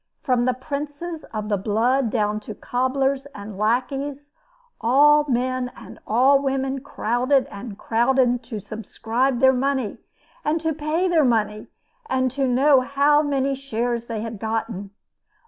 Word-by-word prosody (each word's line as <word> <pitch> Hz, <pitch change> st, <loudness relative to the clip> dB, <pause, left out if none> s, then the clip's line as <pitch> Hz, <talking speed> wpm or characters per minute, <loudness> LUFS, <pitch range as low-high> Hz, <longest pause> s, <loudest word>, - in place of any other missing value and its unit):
From 245 Hz, -2 st, +2 dB
the 255 Hz, -1 st, +1 dB
princes 290 Hz, +5 st, -5 dB
of 215 Hz, -1 st, -5 dB
the 205 Hz, -2 st, 0 dB
blood 230 Hz, +5 st, +1 dB
down 210 Hz, -2 st, 0 dB
to 215 Hz, 0 st, -8 dB
cobblers 265 Hz, +3 st, -1 dB
and 205 Hz, 0 st, -8 dB
lackeys, 270 Hz, +7 st, -1 dB, 0.5 s
all 295 Hz, +5 st, +5 dB
men 255 Hz, 0 st, 0 dB
and -, -, -12 dB
all 265 Hz, +5 st, +4 dB
women 270 Hz, 0 st, -1 dB
crowded 255 Hz, +1 st, +1 dB
and 200 Hz, 0 st, -8 dB
crowded 245 Hz, +2 st, +2 dB
to 225 Hz, -4 st, -5 dB
subscribe 230 Hz, +5 st, -2 dB
their 265 Hz, 0 st, +6 dB
money, 260 Hz, -4 st, -1 dB, 0.4 s
and 315 Hz, +2 st, +1 dB
to 320 Hz, 0 st, -1 dB
pay 310 Hz, +5 st, 0 dB
their 335 Hz, -4 st, +3 dB
money, 215 Hz, -4 st, 0 dB, 0.4 s
and 260 Hz, -1 st, +1 dB
to 270 Hz, +1 st, 0 dB
know 265 Hz, +2 st, +4 dB
how 285 Hz, +3 st, +3 dB
many 275 Hz, -2 st, 0 dB
shares 240 Hz, -3 st, -2 dB
they 225 Hz, -2 st, -4 dB
had 225 Hz, -2 st, -6 dB
gotten. 220 Hz, -2 st, -3 dB
255 Hz, 145 wpm, -23 LUFS, 225-275 Hz, 0.5 s, their